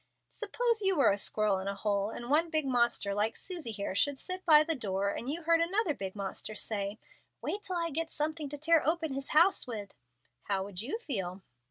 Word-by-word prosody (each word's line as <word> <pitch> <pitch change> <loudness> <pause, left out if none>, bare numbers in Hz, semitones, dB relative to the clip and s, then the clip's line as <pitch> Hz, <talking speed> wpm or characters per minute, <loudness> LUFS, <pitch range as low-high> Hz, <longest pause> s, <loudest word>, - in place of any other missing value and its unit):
"Suppose 460 +1 0
you 385 -3 +2
were 275 - +5
the 200 - 0
squirrel 210 -1 +1
in 190 - -6
the 200 0 -2
hole, 200 0 0
and 240 +1 -7
one 315 +5 +3
big 310 -3 +2
monster, 235 -5 +2
like 210 +3 0
Susie 345 -9 -3
here, 200 -3 -3
should 280 +8 +1
sit 370 +5 -4
by 305 -2 +8
the 325 +1 -1
door, 200 -6 -1
and 240 - -4
you 325 +4 -3
heard 330 +1 +4
another 360 0 +1
big 195 -6 -6
monster 200 +2 -5
say, 205 -1 -3 0.4
'Wait 410 - -3
till 375 -3 -4
I 335 -1 -1
get 325 +3 -2
something 305 -1 -2
to 290 - -6
tear 320 +2 +4
open 320 -2 0
his 275 +1 -4
house 340 +2 +5
with.' 210 -5 -6 0.5
How 195 -2 0
would 195 -1 -5
you 270 - -3
feel?" 195 - -3
275 Hz, 215 wpm, -31 LUFS, 205-330 Hz, 0.5 s, by